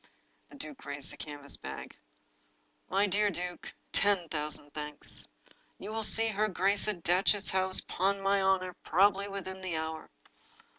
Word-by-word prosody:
The - - -13
duke 285 0 -8
raised 145 -1 -4
the - - -10
canvas 145 -2 -3
bag. - - -7 0.9
"My 195 +2 +3
dear 205 +1 +2
duke, 180 -1 -4 0.2
ten 195 -4 +2
thousand 150 -1 -3
thanks! 150 -1 -6 0.5
You 205 - -7
shall 225 0 -2
see 225 +1 +4
her 215 0 +1
grace 195 +1 +3
at 190 -6 -2
Datchet 190 +3 +3
House, 190 0 +4
'pon 195 +2 0
my 195 0 +2
honor, 190 -1 +2
probably 195 +3 +4
within 190 -1 -6
the 180 -4 -2
hour." 160 0 -4
190 Hz, 150 wpm, -31 LUFS, 170-200 Hz, 0.9 s, see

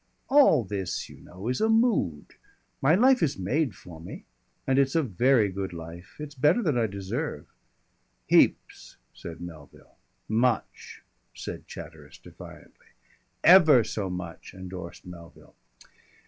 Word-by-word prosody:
"All 265 - +5
this, 95 -2 -4
you - - -13
know, 95 +5 -10
is 125 - -1
a 220 - +2
mood. 220 - +1 0.5
My 150 +5 +4
life 255 +5 +4
is 145 -3 0
made 125 - -1
for 85 -4 -13
me 85 - -10 0.4
and 135 +1 +2
it's 135 +3 +1
a 165 - +3
very 120 0 +2
good 95 -1 -5
life. 85 +2 -10
It's 150 -1 -7
better 150 - +2
than 155 -8 +1
I 115 -2 +1
deserve." 100 - -5 0.8
"Heaps," - - +1 0.2
said 85 0 -10
Melville. 80 -5 -12 0.3
"Much," 115 +1 -1 0.3
said - - -8
Chatteris - - -11
defiantly. - - -15 0.6
"Ever 160 -9 +7
so 105 -2 -4
much," 90 -1 -8
endorsed 90 -2 -9
Melville. 85 -1 -13
110 Hz, 135 wpm, -26 LUFS, 90-150 Hz, 0.8 s, Ever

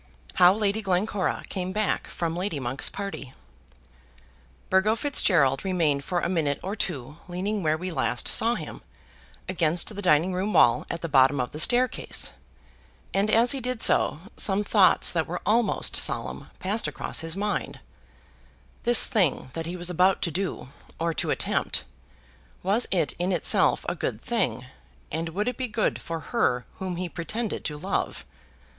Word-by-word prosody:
How 180 - +6
Lady 210 +1 0
Glencora 195 0 -1
Came 185 -1 -4
Back 215 +1 0
from 165 -1 -3
Lady 180 -4 -3
Monk's 130 +1 -1
Party. 195 -10 -6 1.3
Burgo 190 +4 +3
Fitzgerald 170 - +3
remained 160 -7 0
for 175 +3 -1
a - - 0
minute 160 -6 0
or 195 +3 -3
two 150 - -4
leaning 195 +4 -3
where 155 -2 +1
we 180 +3 -5
last 125 -5 -1
saw 230 +2 +4
him, - - -7 0.7
against 175 +2 +2
the 205 - -4
dining 175 0 +3
room 190 +4 -1
wall 115 - +4
at 170 - -4
the - - -1
bottom 135 -1 +4
of 125 - -2
the 150 - -6
staircase; 250 +8 +1 0.8
and 200 +2 +1
as 230 +3 +4
he 275 - 0
did 250 -2 -1
so 155 - +4 0.2
some 200 +1 +1
thoughts 200 -2 +4
that 165 -2 -1
were 180 +2 -4
almost 225 +1 +1
solemn - - -1
passed 205 +4 -1
across - - -3
his 165 +2 -2
mind, 210 +1 -2 1.1
This 240 0 +6
thing 170 - 0
that 165 0 -4
he 175 +2 -5
was 175 0 0
about 185 +2 +2
to 170 - -1
do, 180 -5 -4 0.3
or 165 0 -1
to - - -2
attempt, - - 0 0.8
was 205 +6 +1
it 170 -7 0
in 180 +2 0
itself 175 - +2
a - - 0
good - - -3
thing, 205 - -1 0.5
and 165 +2 -2
would 205 +7 -2
it 250 - -2
be 255 - -2
good 225 -1 -1
for 165 -1 -5
her 125 0 +1
whom 185 -2 -4
he 180 +1 -3
pretended 210 +7 -4
to 150 - -3
love? 190 +6 -3
180 Hz, 165 wpm, -26 LUFS, 160-205 Hz, 1.3 s, How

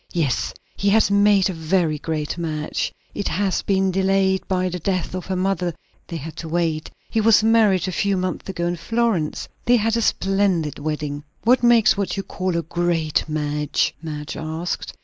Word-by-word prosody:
"Yes, 155 -7 0 0.2
he 200 - +1
has 215 0 +4
made 200 -1 +4
a 190 - -3
very 160 -1 0
great 155 -1 -3
match. 155 -3 -2 0.2
It 205 - -3
has 195 -1 0
been 190 -1 +1
delayed 190 0 +1
by 185 -1 +1
the 180 0 -3
death 185 +1 -1
of 185 -1 -5
her 190 - -1
mother; 180 -2 0 0.3
they 170 - -5
had 155 +1 -7
to 165 - -6
wait. 160 -2 -1 0.2
He 225 - +2
was 215 0 +5
married 220 -5 +4
a - - -1
few 200 +1 0
months 185 +1 -3
ago, 175 -2 -2
in 175 0 -1
Florence. 210 -3 -1 0.2
They 245 - +5
had 225 0 +2
a 230 - +1
splendid 195 -7 +1
wedding." 150 -1 -3 0.2
"What 250 +3 +4
makes 235 -3 +5
what 200 0 -2
you 195 - -2
call 185 -2 -2
a 170 - -1
'great 165 -2 0
match'?" 150 -1 0
Madge 150 -2 -5
asked. 160 +2 -4
185 Hz, 185 wpm, -22 LUFS, 160-200 Hz, 0.3 s, was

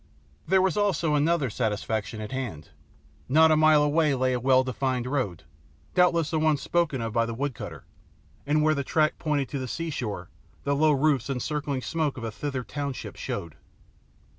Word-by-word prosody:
There 190 +2 +4
was 190 +2 +1
also 180 -6 +1
other 150 -3 +2
satisfaction 110 -1 -2
at 105 - -6
hand. 120 - -5 0.6
Not 160 +4 +6
a - - +5
mile 155 -1 +5
away 150 -1 +2
lay 130 0 +1
a 125 - 0
well 130 +1 +4
defined 130 -1 -2
road 125 - -2 0.5
doubtless 170 -3 +3
the 160 - +1
one 155 -1 +3
spoken 155 -4 0
of 115 -1 -3
by 115 0 +2
the 115 - -4
wood 140 +2 -2
cutter - - -8 0.6
and 150 +1 +2
where 155 0 +4
the 140 -2 -2
track 155 +2 +1
pointed 145 -4 0
to 140 - -3
the 130 - -4
seashore 120 - -4 0.3
the 140 0 +1
low 155 +2 +4
roofs 140 -2 +1
and 135 -2 -1
circling 145 -1 -2
smoke 155 -5 -1
of 120 - -6
a 115 - -3
Thither 135 +2 -4
township 140 0 -5
showed. 80 -3 -5
140 Hz, 185 wpm, -26 LUFS, 125-155 Hz, 0.6 s, Not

